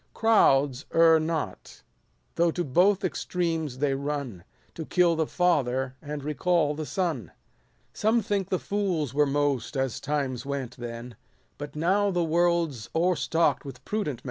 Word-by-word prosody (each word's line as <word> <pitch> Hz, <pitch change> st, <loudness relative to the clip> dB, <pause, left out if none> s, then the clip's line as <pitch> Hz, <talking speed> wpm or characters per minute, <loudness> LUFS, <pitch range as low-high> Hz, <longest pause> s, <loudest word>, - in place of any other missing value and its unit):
Crowds 140 Hz, -, +3 dB
err 165 Hz, -1 st, +6 dB
not, 160 Hz, 0 st, -4 dB, 0.5 s
though 170 Hz, 0 st, +2 dB
to 175 Hz, +2 st, -2 dB
both 185 Hz, +8 st, +3 dB
extremes 165 Hz, -6 st, -2 dB
they 140 Hz, 0 st, +1 dB
run; 140 Hz, -9 st, -4 dB, 0.3 s
To 165 Hz, -, -6 dB
kill 175 Hz, +1 st, +2 dB
the 160 Hz, -1 st, 0 dB
father, 135 Hz, -7 st, +1 dB
and 145 Hz, -1 st, -6 dB
recall 150 Hz, +1 st, +1 dB
the 155 Hz, 0 st, -5 dB
son. 175 Hz, -6 st, -1 dB
100 -, -, -21 dB, 0.6 s
Some 225 Hz, +2 st, +2 dB
think 195 Hz, -2 st, -1 dB
the 185 Hz, -, +1 dB
fools 180 Hz, -, -2 dB
were 145 Hz, 0 st, +3 dB
most, 140 Hz, -2 st, -1 dB
as 130 Hz, -3 st, -1 dB
times 140 Hz, -4 st, -2 dB
went 135 Hz, -3 st, -4 dB
then, 120 Hz, 0 st, -7 dB, 0.4 s
But 145 Hz, 0 st, -7 dB
now 190 Hz, +6 st, +2 dB
the 175 Hz, -2 st, 0 dB
world 170 Hz, -1 st, +2 dB
's 115 Hz, -4 st, -10 dB
o'erstock'd 170 Hz, -1 st, +1 dB
with 135 Hz, -2 st, -10 dB
prudent 205 Hz, -10 st, -2 dB
men. -, -, -18 dB
155 Hz, 155 wpm, -27 LUFS, 135-175 Hz, 0.6 s, err